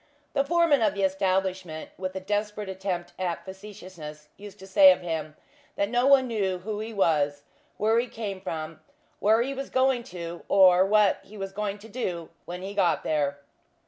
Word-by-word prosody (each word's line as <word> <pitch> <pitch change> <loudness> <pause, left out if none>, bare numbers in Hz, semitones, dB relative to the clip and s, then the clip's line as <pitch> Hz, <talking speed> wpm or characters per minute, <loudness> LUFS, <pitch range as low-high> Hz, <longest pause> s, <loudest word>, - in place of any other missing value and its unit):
The 275 - +2
foreman 330 -3 +3
of 210 -2 +2
the 200 - -1
establishment 190 -3 -1
with 185 0 -5
a - - -2
desperate 210 +1 -2
attempt 185 -2 -4
at 180 -2 -3
facetiousness, 185 -6 -10
used 205 0 -11
to 190 - -12
say 280 +9 +7
of 275 - 0
him, 160 -3 -4 0.4
that 200 - 0
no 245 +2 +2
one 275 -2 +6
knew 200 -5 -1
who 210 +3 -5
he 220 +1 -5
was, 145 -8 +1 0.3
where 220 +2 +3
he 245 - -1
came 205 -5 -6
from, 160 -3 -5 0.4
where 220 +3 +4
he 270 +2 -3
was 275 0 -5
going 260 -1 +2
to, 170 -1 -7
or 185 -2 +6
what 210 -1 +4
he 210 +2 -13
was 195 -1 -5
going 205 0 -3
to 210 +2 -13
do 180 -8 -4 0.2
when 180 +1 -7
he 195 +1 -5
got 185 -4 +2
there. 145 -2 -1
195 Hz, 185 wpm, -26 LUFS, 175-215 Hz, 0.4 s, say